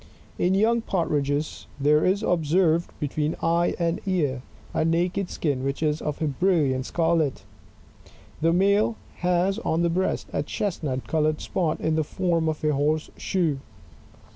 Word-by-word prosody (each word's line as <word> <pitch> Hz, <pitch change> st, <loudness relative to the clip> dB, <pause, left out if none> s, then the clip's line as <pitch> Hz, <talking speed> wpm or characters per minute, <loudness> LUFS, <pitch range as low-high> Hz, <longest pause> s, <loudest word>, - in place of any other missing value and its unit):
In 185 Hz, +2 st, +2 dB
young 230 Hz, +4 st, +3 dB
Partridges 150 Hz, -6 st, -1 dB
there 150 Hz, +2 st, +4 dB
is 195 Hz, +3 st, +2 dB
observed, 170 Hz, -1 st, +2 dB
between 150 Hz, +1 st, -1 dB
eye 170 Hz, +1 st, +1 dB
and 170 Hz, -1 st, -1 dB
ear, 145 Hz, -9 st, 0 dB, 0.3 s
a -, -, +1 dB
naked 175 Hz, +3 st, 0 dB
skin 140 Hz, -5 st, -1 dB
which 140 Hz, +3 st, -2 dB
is 150 Hz, 0 st, 0 dB
of 150 Hz, -1 st, -3 dB
a -, -, +1 dB
brilliant 145 Hz, -4 st, +1 dB
scarlet. 165 Hz, -4 st, +1 dB, 1.0 s
The 165 Hz, +1 st, +3 dB
male 200 Hz, +5 st, +3 dB, 0.2 s
has 180 Hz, +2 st, +1 dB
on 165 Hz, +2 st, 0 dB
the 170 Hz, -, +2 dB
breast 185 Hz, +3 st, 0 dB
a -, -, 0 dB
chestnut 150 Hz, -10 st, -3 dB
coloured 155 Hz, -1 st, +1 dB
spot 165 Hz, -4 st, -1 dB
in 160 Hz, -, 0 dB
the 155 Hz, -, +2 dB
form 170 Hz, 0 st, 0 dB
of 155 Hz, 0 st, -4 dB
a 150 Hz, -1 st, +2 dB
horse 150 Hz, +2 st, 0 dB
shoe. 165 Hz, -7 st, 0 dB
165 Hz, 150 wpm, -25 LUFS, 150-180 Hz, 1.0 s, there